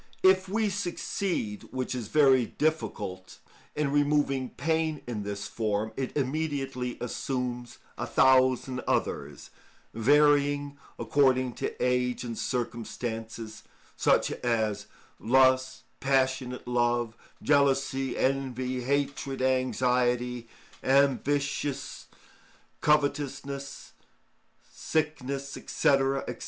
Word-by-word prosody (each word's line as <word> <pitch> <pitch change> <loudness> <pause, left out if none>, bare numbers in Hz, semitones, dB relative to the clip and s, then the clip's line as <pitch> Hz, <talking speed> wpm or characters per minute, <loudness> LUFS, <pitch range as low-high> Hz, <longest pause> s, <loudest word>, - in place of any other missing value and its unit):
If 190 0 +5
we 215 +2 +1
succeed, 180 - -2
which 130 0 -3
is 120 -4 -4
very 135 -3 +4
difficult, 105 -12 -3 0.4
in 150 -2 0
removing 145 -3 +1
pain 160 -1 -1
in 115 -4 -4
this 100 0 -5
form, 110 -1 -2
it 135 +2 -3
immediately 135 -3 -2
assumes 125 -1 -4 0.2
a - - -2
thousand 130 0 +3
others, - - -2 0.4
varying 145 +3 +3 0.2
according 130 -4 +2
to - - -2
age 125 0 0
and 120 -2 -5
circumstances, 115 -2 -4 0.3
such - - +2
as 110 -4 0 0.3
lust, 130 +1 +3 0.2
passionate 130 -2 0
love, 120 -2 +1 0.3
jealousy, 135 -2 +2
envy, 130 -1 -1
hatred, 140 +1 -1
anxiety, 125 -2 +1 0.4
ambition, 140 +1 +2 1.1
covetousness, 140 -2 -1 0.8
sickness, 140 -3 -2
&c., - - -7
&c. 140 - +3
130 Hz, 90 wpm, -28 LUFS, 125-145 Hz, 1.1 s, If